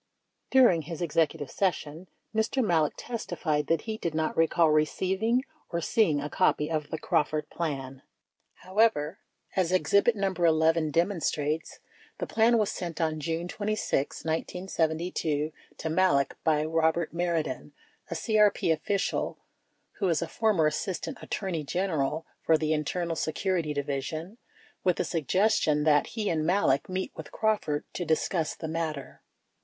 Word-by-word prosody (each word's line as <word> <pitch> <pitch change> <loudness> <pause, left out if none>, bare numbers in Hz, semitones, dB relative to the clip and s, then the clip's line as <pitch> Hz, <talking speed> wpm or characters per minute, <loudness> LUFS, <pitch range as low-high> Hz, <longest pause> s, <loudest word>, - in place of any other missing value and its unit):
During 240 -11 +5
his 165 +1 -7
Executive 160 -3 0
Session, 170 -2 -2 0.3
Mr. 225 +3 +1
Malek 160 -6 +2
testified 155 - -2
that 165 -2 +2
he 220 -1 -5
did 165 -6 -3
not 160 0 0
recall 165 0 +3
receiving 190 +10 +1 0.3
or 170 - -1
seeing 165 -3 +2
a 145 - -3
copy 150 -1 +1
of 155 -2 -2
the 160 - -3
"Crawford 155 0 0
Plan." 135 -5 -4 0.6
However, 185 -5 +2 0.4
as 180 -2 +1
exhibit 200 +5 +3
No. 195 -2 0
11 160 -2 +3
demonstrates, 165 -3 0 0.4
the - - -3
plan 230 +1 +3
was 215 -2 +1
sent 170 -2 -5
on 155 -2 0
June 165 +3 -2
26, 205 -9 -2
1972, 160 -2 -1 0.3
to 160 - -3
Malek 160 -6 +2
by 155 -1 +2
Eobert 160 +1 +1
Mardian, 170 -5 -2 0.4
a 170 - -3
CEP 210 -1 +3
official 195 +5 -1 0.6
who 195 -3 +1
is 165 0 +1
a - - -4
former 210 -7 +2
Assistant 190 - -2
Attorney 180 -6 -3
General 160 -2 -1 0.2
for 160 - +4
the 155 0 0
Internal 165 +3 -1
Security 165 0 -1
Division, 150 - -4 0.4
with 180 -2 +3
the - - 0
sug 160 -6 -3
gestion 185 -7 +3
that 145 -2 +4
he 215 -2 -1
and 160 -4 +1
Malek 155 -5 +2
meet 185 0 -2
with - - -9
Crawford 210 -9 0
to 180 - -3
discuss 160 0 0
the 160 - -6
matter. 160 -3 -4
165 Hz, 140 wpm, -28 LUFS, 155-190 Hz, 0.6 s, During